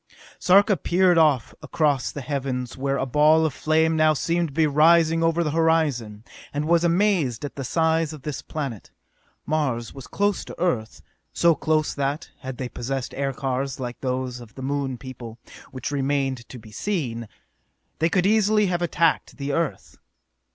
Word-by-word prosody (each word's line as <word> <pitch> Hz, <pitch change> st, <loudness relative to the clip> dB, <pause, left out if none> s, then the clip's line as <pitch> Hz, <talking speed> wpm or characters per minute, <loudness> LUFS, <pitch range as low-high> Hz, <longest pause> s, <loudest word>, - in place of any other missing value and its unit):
Sarka 200 Hz, +2 st, +5 dB
peered 180 Hz, -1 st, +3 dB
off 145 Hz, -7 st, +2 dB
across 145 Hz, -5 st, 0 dB
the 145 Hz, -, -6 dB
heavens 130 Hz, -2 st, -3 dB
where 135 Hz, +1 st, -1 dB
a 135 Hz, -, -1 dB
ball 150 Hz, +4 st, +4 dB
of 155 Hz, -, -1 dB
flame 160 Hz, +2 st, +2 dB
now 155 Hz, -1 st, +4 dB
seemed 170 Hz, +4 st, 0 dB
to 140 Hz, -, -12 dB
be 160 Hz, -1 st, +4 dB
rising 165 Hz, +2 st, +4 dB
over 165 Hz, +1 st, +2 dB
the 150 Hz, -, -1 dB
horizon, 145 Hz, -10 st, +1 dB, 0.3 s
and 145 Hz, +1 st, -2 dB
was 170 Hz, 0 st, +3 dB
amazed 170 Hz, -, +1 dB
at 145 Hz, -, -7 dB
the 135 Hz, -, -5 dB
size 160 Hz, +3 st, +1 dB
of 150 Hz, -4 st, -10 dB
this 150 Hz, -3 st, -4 dB
planet. 135 Hz, -9 st, -6 dB, 0.6 s
Mars 135 Hz, -7 st, -1 dB
was 135 Hz, -1 st, -10 dB
close 205 Hz, -1 st, 0 dB
to -, -, -10 dB
Earth, 145 Hz, -12 st, -1 dB, 0.3 s
so 170 Hz, -1 st, +4 dB
close 155 Hz, -1 st, 0 dB
that, 140 Hz, +3 st, -3 dB
had 130 Hz, -1 st, -7 dB
they 130 Hz, -, -3 dB
possessed 130 Hz, +2 st, -4 dB
aircars 135 Hz, 0 st, -2 dB
like 125 Hz, -1 st, -6 dB
those 130 Hz, -1 st, -2 dB
of 120 Hz, -2 st, -13 dB
the 130 Hz, -, -8 dB
Moon 135 Hz, -1 st, -2 dB
people 120 Hz, -2 st, -9 dB, 0.3 s
which 130 Hz, +1 st, -5 dB
remained 135 Hz, -3 st, -1 dB
to 130 Hz, -, -9 dB
be 110 Hz, -2 st, -14 dB
seen 120 Hz, -, -3 dB, 0.7 s
they 165 Hz, -, +2 dB
could 180 Hz, +1 st, +1 dB
easily 210 Hz, 0 st, +3 dB
have 175 Hz, -2 st, -1 dB
attacked 165 Hz, -1 st, +1 dB
the 140 Hz, 0 st, -3 dB
Earth. 165 Hz, -3 st, -3 dB
145 Hz, 170 wpm, -24 LUFS, 130-165 Hz, 0.7 s, Sarka